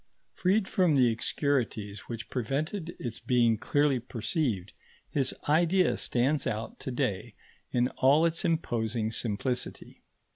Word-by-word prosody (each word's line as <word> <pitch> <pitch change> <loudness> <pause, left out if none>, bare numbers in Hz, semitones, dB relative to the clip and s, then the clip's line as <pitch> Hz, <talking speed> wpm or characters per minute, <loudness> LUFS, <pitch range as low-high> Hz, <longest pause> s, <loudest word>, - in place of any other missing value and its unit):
Freed 190 +2 +1
from 180 -6 +3
the 125 -3 +5
obscurities 115 -5 -2
which 115 -1 -6
prevented 155 - -2
its 120 -2 -5
being 120 -2 +3
clearly 145 -1 +2
perceived, 115 - -2 0.4
his 135 -3 +2 0.2
idea 170 +5 +3
stands 130 +4 0
out 110 +1 -4
to - - -5
day 120 -4 -2 0.3
in 125 0 +2
all 140 +5 +5
its 165 0 +1
imposing 115 -9 0
simplicity. 120 +3 -3
125 Hz, 120 wpm, -29 LUFS, 115-155 Hz, 0.4 s, the